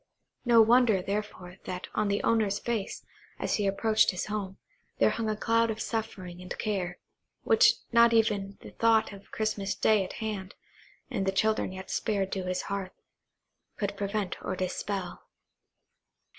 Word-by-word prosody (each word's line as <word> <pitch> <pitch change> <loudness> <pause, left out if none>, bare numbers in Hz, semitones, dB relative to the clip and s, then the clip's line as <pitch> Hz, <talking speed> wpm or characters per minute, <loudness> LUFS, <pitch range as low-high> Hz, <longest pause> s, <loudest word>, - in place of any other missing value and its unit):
No 235 -2 +7
wonder, 230 -3 +5
therefore, 195 -3 -4
that 180 0 -5
on 215 - +1
that 200 0 0
owner's 215 -3 +2
face, 220 -2 -3 0.3
as - - 0
he 205 -2 0
approached 215 +2 +3
his 180 - -2
home, 200 -2 -4 0.4
there - - +4
hung 225 -1 -2
a 215 - 0
cloud 230 +1 +2
of 220 0 -3
suffering 185 -6 -4
and 180 - -7
care, 185 -4 -2 0.5
which 455 +2 +6 0.2
not 235 0 +6
even 205 -3 +1
the - - -10
thought 225 -2 +2
of 200 - -10
the - - -26
Christmas 215 -2 -2
day 215 -3 +3
at 185 - -7
hand, 210 -4 -5 0.6
and 195 -6 -1
the - - +3
children 215 +1 +1
yet 190 0 -8
spared 200 -3 -1
to 190 -2 -3
his 185 0 -2
hearth, 195 -2 -5 0.8
could 200 -1 -2
prevent 200 -1 -3
or 190 - -2
dispel. 185 0 -4
205 Hz, 160 wpm, -29 LUFS, 190-220 Hz, 0.8 s, No